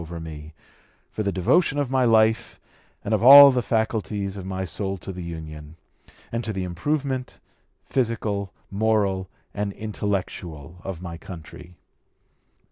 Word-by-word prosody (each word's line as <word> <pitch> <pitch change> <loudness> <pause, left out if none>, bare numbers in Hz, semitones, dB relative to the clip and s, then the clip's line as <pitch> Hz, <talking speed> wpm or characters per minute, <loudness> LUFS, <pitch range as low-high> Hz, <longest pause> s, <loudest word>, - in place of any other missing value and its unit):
215) 85 +1 -9 0.2
over 75 - -11
me, - - -19 0.6
for - - -4
the 100 -2 0
devotion 135 - +2
of 140 -3 -1
my 130 -1 +2
life 110 0 +2 0.5
and 105 - -1
of 105 - +2
all 140 +3 +11
the 125 -1 +1
faculties 110 -4 -1
of 95 -2 -7
my 95 0 -3
soul 95 +1 -3
to 95 - -7
the 90 -1 -7
Union, 80 -2 -8 0.6
and 115 +1 -2
to 110 - -3
the 95 -2 -3
improvement, 130 - -3 0.5
physical, 110 -6 -1 0.2
moral, 100 -3 +1 0.2
and 100 0 -2
intellectual 90 -6 -5
of 95 -2 -6
my 85 -2 -7
country." 85 -1 -11
100 Hz, 145 wpm, -24 LUFS, 90-115 Hz, 0.6 s, all